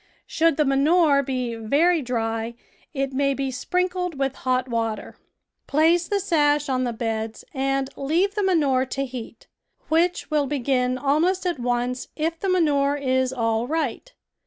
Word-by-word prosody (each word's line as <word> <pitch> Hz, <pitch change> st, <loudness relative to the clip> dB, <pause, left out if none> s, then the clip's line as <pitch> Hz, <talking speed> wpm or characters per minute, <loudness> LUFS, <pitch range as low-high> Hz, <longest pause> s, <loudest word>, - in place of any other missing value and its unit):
Should 330 Hz, -2 st, +1 dB
the 300 Hz, -, +3 dB
manure 285 Hz, +2 st, +4 dB
be 255 Hz, -3 st, -3 dB
very 290 Hz, +10 st, +2 dB
dry 225 Hz, -2 st, -2 dB, 0.4 s
it 275 Hz, -2 st, -2 dB
may 275 Hz, +1 st, +1 dB
be 270 Hz, -1 st, -2 dB
sprinkled 360 Hz, +5 st, -2 dB
with 270 Hz, -1 st, 0 dB
hot 255 Hz, -1 st, -1 dB
water. 225 Hz, -2 st, -3 dB, 0.5 s
Place 330 Hz, +4 st, +3 dB
the 405 Hz, -, 0 dB
sash 295 Hz, -6 st, +2 dB
on 255 Hz, -1 st, 0 dB
the 240 Hz, -, -1 dB
beds 225 Hz, -1 st, -4 dB
and 270 Hz, -1 st, 0 dB
leave 335 Hz, +8 st, 0 dB
the 415 Hz, -, -1 dB
manure 290 Hz, -9 st, +2 dB
to 275 Hz, +2 st, -2 dB
heat, 245 Hz, -3 st, -9 dB, 0.4 s
which 335 Hz, +1 st, +1 dB
will 295 Hz, -2 st, +2 dB
begin 255 Hz, -2 st, 0 dB
almost 315 Hz, +8 st, +1 dB
at 350 Hz, -6 st, -1 dB
once 245 Hz, +1 st, -1 dB
if 325 Hz, +1 st, -2 dB
the 390 Hz, -, -2 dB
manure 290 Hz, -6 st, +2 dB
is 260 Hz, -2 st, 0 dB
all 230 Hz, -2 st, 0 dB
right. 315 Hz, -, -2 dB
275 Hz, 155 wpm, -23 LUFS, 250-325 Hz, 0.5 s, manure